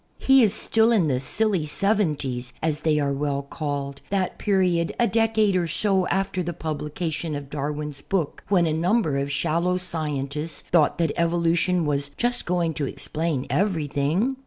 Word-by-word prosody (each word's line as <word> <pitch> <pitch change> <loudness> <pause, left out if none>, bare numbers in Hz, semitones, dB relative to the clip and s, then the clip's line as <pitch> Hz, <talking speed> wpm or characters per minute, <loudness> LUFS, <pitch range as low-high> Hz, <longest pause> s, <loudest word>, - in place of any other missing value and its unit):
He 270 0 +5
is 215 -4 +4
still 225 +3 +2
in 190 -9 +3
the 130 -2 +1
"silly 185 +4 0
seventies," 150 - -1
as 155 -2 0
they 155 -1 +1
are 140 -1 +1
well 140 0 -1
called, 140 -2 -4
that 195 -2 -1
period 180 -5 +1
a 240 - +5
decade 220 -3 +2
or 175 -2 +1
so 190 +1 +1
after 195 -1 0
the 175 0 -3
publication 155 0 -3
of 140 -1 -7
Darwin's 150 0 -4
book 180 -7 -2
when 180 -4 +3
a 160 - 0
number 165 -3 +1
of 140 +1 -2
shallow 170 +5 +1
scientists 150 -3 -3
thought 160 -3 +2
that 165 -3 +1
evolution 170 +1 +2
was 145 -1 0
just 240 +1 0
going 175 -2 +1
to 145 -2 -2
explain 155 -3 -2
everything. 175 - 0
165 Hz, 160 wpm, -24 LUFS, 145-190 Hz, -, He